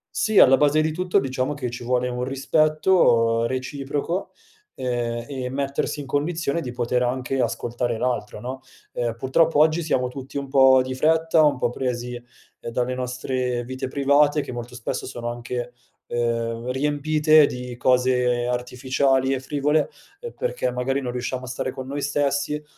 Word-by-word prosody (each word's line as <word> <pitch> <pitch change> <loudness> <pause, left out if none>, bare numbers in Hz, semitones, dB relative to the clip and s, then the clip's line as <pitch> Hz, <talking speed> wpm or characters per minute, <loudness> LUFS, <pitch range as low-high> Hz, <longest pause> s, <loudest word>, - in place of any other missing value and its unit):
Sì, 220 -2 +1
alla 130 +1 +8
base 150 +1 +3
di 155 - 0
tutto 180 +3 0
diciamo 130 +2 -2
che 125 -4 -4
ci 120 0 -7
vuole 125 +1 0
un 125 0 -3
rispetto 135 -4 +3
reciproco, 140 +7 -3 0.5
ehm, 120 -2 -2
e 130 -3 -4
mettersi 140 +2 -2
in - - -8
condizione 155 +3 -1
di 125 - -5
poter 125 0 -1
anche 125 +2 -1
ascoltare 120 -1 -2
l'altro 110 -4 -2
no, 130 +4 -6 0.3
ehm, 120 -2 -2
purtroppo 145 +6 +2
oggi 155 +3 +4
siamo 130 -5 0
tutti 135 +2 -8
un 140 -1 -4
po' 130 -1 +6
di 130 0 -4
fretta, 160 +3 +3
un 145 -2 +3
po' 120 -1 0
presi 125 -1 -3 0.4
dalle 125 +2 -2
nostre 125 -1 -2
vite 130 +2 -5
private, 145 +2 +3
che - - -7
molto 120 0 -7
spesso 120 - -4
sono 120 -2 -4
anche, 120 0 -5 0.3
ehm, 115 0 -2
riempite 150 +2 +3
di 125 0 -6
cose 125 -1 +2
artificiali 130 +2 0
e 135 - -1
frivole, 145 +3 0 0.5
perché - - -1
magari 130 +2 -1
non 125 -2 -3
riusciamo 125 +1 -4
a - - -10
stare 130 +1 -3
con 130 0 -7
noi 145 +1 -4
stessi, 145 +1 0
130 Hz, 160 wpm, -23 LUFS, 125-145 Hz, 0.5 s, alla